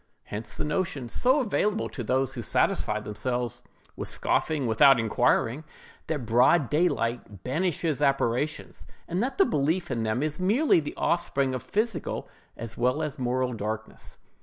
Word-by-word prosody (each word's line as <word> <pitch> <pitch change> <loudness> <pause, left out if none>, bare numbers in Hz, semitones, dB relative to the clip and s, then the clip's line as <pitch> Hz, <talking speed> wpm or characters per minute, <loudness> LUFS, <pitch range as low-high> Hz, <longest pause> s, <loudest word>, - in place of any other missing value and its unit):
Hence 105 +2 -6
the - - -1
notion, 150 -5 -2
so 260 - +3
available 210 -2 0
to 130 - -6
those 130 +3 0
who 125 - -5
satisfy 105 -1 +1
themselves 120 +3 -3 0.3
with - - -5
scoffing 155 -4 0
without 125 +3 +6
inquiring, 120 +4 +1 0.4
that 150 -6 -2
broad 125 +5 +4
daylight 120 - 0
banishes 160 +1 -1
apparitions, 140 +1 0 0.2
and 175 +3 -1
that 265 +3 -2
the 390 - +6
belief 160 - 0
in 120 -2 -1
them 110 +4 0
is 155 +1 -2
merely 210 - +3
the 150 - -5
offspring 140 -6 +1
of 130 - -3
physical 210 - -2 0.3
as 115 -1 -6
well 125 +6 +1
as 150 -3 -4
moral 125 0 0
darkness. 110 0 -6
135 Hz, 150 wpm, -27 LUFS, 120-165 Hz, 0.4 s, without